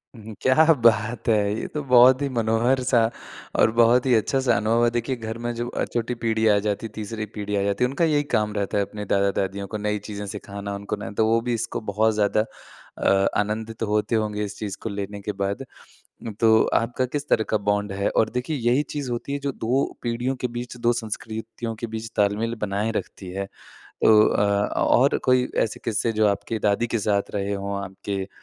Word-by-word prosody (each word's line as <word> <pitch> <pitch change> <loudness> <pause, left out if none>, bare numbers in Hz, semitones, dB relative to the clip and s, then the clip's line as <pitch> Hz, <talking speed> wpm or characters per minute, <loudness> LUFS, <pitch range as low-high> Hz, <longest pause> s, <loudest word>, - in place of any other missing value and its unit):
क्या 130 +9 +3
बात 115 0 +3
है! 105 -2 +2
ये - - -4
तो 150 - -4
बहुत 125 +1 +6
ही 140 - +1
मनोहर-सा 120 +3 +2 0.6
और 110 - +5
बहुत 120 +2 +5
ही 130 - +3
अच्छा-सा 125 +2 +2
अनुभव 115 +3 +2
है। - - +4
देखिए, 120 +2 -1
घर 115 -1 -6
में 120 0 -3
जो 120 +1 -3
अ, - - -2
छोटी 120 +1 -2
पीढ़ी 110 -1 0
आ 105 -1 +5
जाती, 105 +2 -2
तीसरी 110 0 -5
पीढ़ी 105 0 -3
आ 100 - +1
जाती 100 +3 0
है, 125 - +4
उनका 140 +6 +1
यही 150 -2 +2
काम 105 -1 0
रहता 100 0 -1
है, 100 - +2
अपने 105 +1 -7
दादा-दादियों 100 0 0
को 110 - -4
नई 105 0 -1
चीज़ें 105 -1 -5
सिखाना, 100 0 -6
उनको 100 +1 -4
ना 100 - -7
तो, 110 +2 +1
वो 115 +1 +3
भी 120 +1 -2
इसको 115 - -3
बहुत 110 +2 +2
ज़्यादा 105 +1 +2 0.5
अ, 95 0 +3
आनंदित 110 +2 -2
होते 105 +1 0
होंगे 105 -1 -1
इस 105 0 -6
चीज़ 100 -3 -4
को 115 - -3
लेने 100 0 -5
के 105 - -3
बाद। 100 +6 -1 0.8
तो 115 -1 +5 0.2
आपका 120 +2 +1
किस 145 0 -2
तरह 110 - +3
का 110 - +2
बॉन्ड 105 0 0
है? 100 +1 0
और 110 - +2
देखिए 125 +5 -2
यही 125 +3 +2
चीज़ 140 -4 -4
होती 120 +4 -4
है 140 - -1
जो 140 0 -3
2 125 +3 0 0.2
पीढ़ियों 120 +2 -1
के 125 0 -2
बीच, 120 0 -5
2 120 0 +2
संस्कृतियों 115 0 -5
के - - -1
बीच 115 +1 -6
ताल-मेल 105 +3 +1
बनाए 105 +2 -1
रखती 95 - -5
है। 95 +2 -4 0.3
तो 110 -1 +4
अ, - - +1 0.4
और 135 +4 +4
कोई 125 -1 +3 0.2
ऐसे 110 - -4
किस्से, 115 +1 0
जो 110 -1 +2
आपकी 105 +2 -1
दादी 105 +4 +1
के 115 -1 -1
साथ 100 -1 0
रहे 100 0 -1
हों, 100 0 -3
आपके 95 0 -5
110 Hz, 205 wpm, -24 LUFS, 105-120 Hz, 0.8 s, बहुत